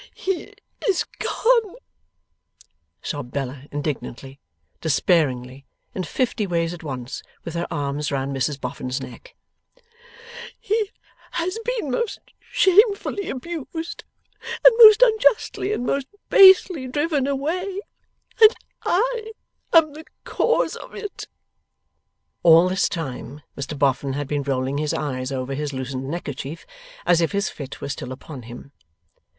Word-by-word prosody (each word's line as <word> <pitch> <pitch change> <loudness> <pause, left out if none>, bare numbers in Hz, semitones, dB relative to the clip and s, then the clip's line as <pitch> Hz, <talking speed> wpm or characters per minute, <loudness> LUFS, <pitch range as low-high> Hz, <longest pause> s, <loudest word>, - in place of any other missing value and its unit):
'He 380 -2 -3 0.4
is 380 - +2
gone,' 460 -4 +2 1.3
sobbed 145 -5 -5
Bella 135 -1 -4
indignantly, 140 -2 -5 0.4
despairingly, 140 -5 +1 0.3
in 190 - -3
fifty 225 +2 -1
ways 170 -1 0
at 175 - -9
once, 130 -5 -6 0.2
with 165 - -6
her 170 0 -2
arms 145 -1 -2
round 135 0 -2
Mrs 135 +2 -1
Boffin's 125 0 -4
neck. - - -11 1.2
'He 425 0 0 0.4
has 365 +6 -2 0.2
been 300 - -3
most 465 - -1 0.2
shamefully 400 +1 +2
abused, 325 +3 -6 0.6
and - - +10
most 435 +1 +10
unjustly 440 -3 +2
and 245 - -2
most 275 0 -1 0.2
basely 375 -7 +7
driven 290 +1 0
away, 360 +8 -2 0.6
and 435 +1 +9 0.3
I 445 +2 0 0.4
am 315 -3 +5
the 315 +2 -10 0.2
cause - - +1
of - - -11
it!' 415 -2 -7 1.1
All 165 +1 +7
this 190 +1 +1
time, 145 - -6
Mr 140 +2 -5
Boffin 135 0 +1
had 145 0 -3
been 145 0 -1
rolling 135 0 -1
his 150 -1 -1
eyes 130 -3 -3
over 130 0 -3
his 145 +1 -3
loosened 130 0 -4
neckerchief, 150 -2 -5 0.4
as 175 -1 +4
if 165 - 0
his 200 0 0
fit 140 -2 -9
were - - -4
still 130 - -5
upon 135 +1 -9
him. 120 +4 -11
165 Hz, 125 wpm, -23 LUFS, -, 1.3 s, and